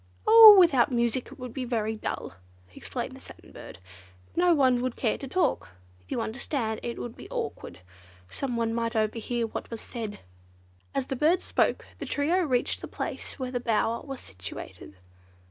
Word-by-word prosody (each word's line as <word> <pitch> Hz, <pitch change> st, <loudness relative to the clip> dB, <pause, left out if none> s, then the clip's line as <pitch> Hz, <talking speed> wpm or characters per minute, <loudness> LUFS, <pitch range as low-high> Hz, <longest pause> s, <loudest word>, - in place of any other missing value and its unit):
"Oh, 440 Hz, -1 st, +11 dB
without 295 Hz, -10 st, +5 dB
music 240 Hz, 0 st, 0 dB
it -, -, -12 dB
would 250 Hz, -3 st, -8 dB
be 265 Hz, -, -4 dB
very 220 Hz, -3 st, -1 dB
dull," 215 Hz, -, -5 dB, 0.4 s
explained -, -, -5 dB
the -, -, -13 dB
Satin -, -, -14 dB
Bird. -, -, -11 dB, 0.6 s
"No 355 Hz, +1 st, +4 dB
one 260 Hz, -6 st, +3 dB
would 255 Hz, -1 st, -2 dB
care 225 Hz, -, -1 dB
to 275 Hz, -, -6 dB
talk. 355 Hz, -, 0 dB, 0.4 s
You 230 Hz, -, -2 dB
understand, 225 Hz, -1 st, -3 dB
it 235 Hz, -, -5 dB
would 240 Hz, -, -6 dB
be -, -, -12 dB
awkward, -, -, -5 dB, 0.5 s
someone 235 Hz, -, -2 dB
might 230 Hz, 0 st, -2 dB
overhear 230 Hz, +2 st, -1 dB
what 225 Hz, -, -6 dB
was 230 Hz, -, -6 dB
said." 220 Hz, -4 st, -6 dB, 0.8 s
As 270 Hz, -, 0 dB
the 265 Hz, -, -3 dB
bird 310 Hz, +7 st, +2 dB
spoke -, -, 0 dB
the -, -, -5 dB
trio 310 Hz, +6 st, +1 dB
reached 255 Hz, -8 st, 0 dB
the -, -, -6 dB
place -, -, -6 dB
where 255 Hz, -2 st, -4 dB
the 245 Hz, -, -1 dB
bower 230 Hz, -1 st, 0 dB
was 270 Hz, -3 st, -7 dB
situated. 95 Hz, +1 st, -9 dB
245 Hz, 170 wpm, -27 LUFS, 225-275 Hz, 0.8 s, Oh